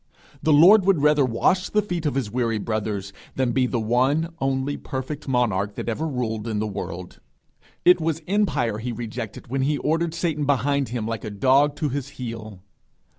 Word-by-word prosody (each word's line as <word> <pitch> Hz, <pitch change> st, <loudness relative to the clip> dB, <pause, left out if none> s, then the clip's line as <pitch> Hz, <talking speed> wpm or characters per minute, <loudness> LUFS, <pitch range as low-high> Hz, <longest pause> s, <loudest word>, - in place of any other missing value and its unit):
The 155 Hz, -, +2 dB
Lord 185 Hz, +8 st, +7 dB
would 185 Hz, -7 st, +3 dB
rather 150 Hz, -1 st, +5 dB
wash 135 Hz, +10 st, +1 dB
the 210 Hz, 0 st, +2 dB
feet 175 Hz, -5 st, -2 dB
of 145 Hz, -, -1 dB
his 125 Hz, -7 st, -2 dB
weary 115 Hz, -2 st, 0 dB
brothers, 105 Hz, -2 st, -3 dB, 0.2 s
than 130 Hz, -2 st, +1 dB
be 130 Hz, +1 st, +2 dB
the 120 Hz, -, -1 dB
one 130 Hz, +9 st, +1 dB
only 135 Hz, +1 st, -1 dB
perfect 135 Hz, +3 st, -6 dB
monarch 105 Hz, -6 st, 0 dB
that -, -, -5 dB
ever 135 Hz, +8 st, -1 dB
ruled 115 Hz, -6 st, -3 dB
in 110 Hz, -2 st, -2 dB
the 105 Hz, -, 0 dB
world. 90 Hz, -3 st, -6 dB, 0.7 s
It 180 Hz, -1 st, +6 dB
was 160 Hz, 0 st, -1 dB
empire 150 Hz, -, +1 dB
he 120 Hz, +2 st, -3 dB
rejected 115 Hz, -1 st, -6 dB
when 135 Hz, 0 st, 0 dB
he 145 Hz, +2 st, +1 dB
ordered 165 Hz, +3 st, 0 dB
Satan 150 Hz, -5 st, -1 dB
behind 140 Hz, 0 st, +1 dB
him 120 Hz, -3 st, -3 dB
like 115 Hz, -2 st, -4 dB
a 110 Hz, -, -4 dB
dog 135 Hz, +8 st, +3 dB
to 150 Hz, -, -1 dB
his 140 Hz, 0 st, -4 dB
heel. 110 Hz, -6 st, -7 dB
130 Hz, 185 wpm, -24 LUFS, 115-150 Hz, 0.7 s, Lord